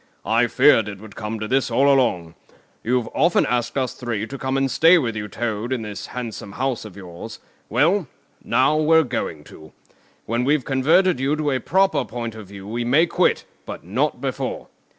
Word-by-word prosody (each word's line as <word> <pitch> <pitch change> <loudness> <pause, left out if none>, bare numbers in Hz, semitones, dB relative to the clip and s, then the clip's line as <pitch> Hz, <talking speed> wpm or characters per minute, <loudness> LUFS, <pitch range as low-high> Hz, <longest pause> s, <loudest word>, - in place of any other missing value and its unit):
I 115 +2 +3
feared 125 -4 +4
it 100 - -7
would 110 +1 -13
come 110 0 -5
to 110 - -4
this 130 +2 +1
all 130 +4 +3
along. 120 -12 +2 0.5
You've 120 -1 0
often 170 +2 +3
asked 120 +1 -1
us 130 -2 -1
three 115 -4 -3
to 140 +4 -8
come 130 0 -1
and 135 -1 0
stay 165 +7 +6
with 120 -8 -1
you, 105 -1 -4
Toad, 110 +2 -3
in 125 -4 -1
this 105 -1 -7
handsome 115 -5 -7
house 130 -1 -2
of 100 -2 -11
yours; 90 -3 -9 0.3
well, 175 +2 +2 0.4
now 135 +4 +2
we're 160 +1 +4
going 115 - -4
to. 80 +1 -15 0.5
When 115 +2 -1
we've 140 0 +1
converted 155 +5 +3
you 135 +3 +1
to 150 -1 -1
a 130 - 0
proper 190 +9 +2
point 115 -1 -5
of 110 -3 -10
view 100 0 -10
we 120 +3 -3
may 140 +8 +4
quit, 460 - +1 0.2
but - - -7
not - - -1
before. - - -4
125 Hz, 190 wpm, -22 LUFS, 110-140 Hz, 0.5 s, stay